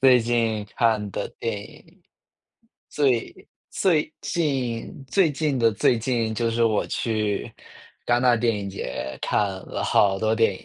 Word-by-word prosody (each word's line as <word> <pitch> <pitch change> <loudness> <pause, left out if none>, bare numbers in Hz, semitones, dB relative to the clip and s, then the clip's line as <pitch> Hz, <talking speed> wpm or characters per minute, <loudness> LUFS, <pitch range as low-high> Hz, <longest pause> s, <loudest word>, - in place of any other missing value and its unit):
最 130 -2 +6
近 115 -2 0
看 110 -3 +2
的 - - -4
电 110 -3 -2
影， 100 - -16 0.9
最 130 -6 -1 0.2
最 155 -4 +1
近 135 -6 -2
最 185 +1 +3
近 145 -2 -1
的 115 -2 +3
最 115 +3 +2
近， 115 -1 -1
就 115 +1 0
是 115 +1 0
我 110 -2 +1
去 105 -3 -2 0.5
戛 120 0 +3
纳 125 -2 +4
电 115 -1 +1
影 100 -1 -5
节 65 -7 -5
看 - - +1 0.3
了 - - -4
好 95 -1 +3
多 110 0 +2
电 115 -4 +3
影。 - - -13
115 Hz, 165 characters per minute, -24 LUFS, 110-130 Hz, 0.9 s, 最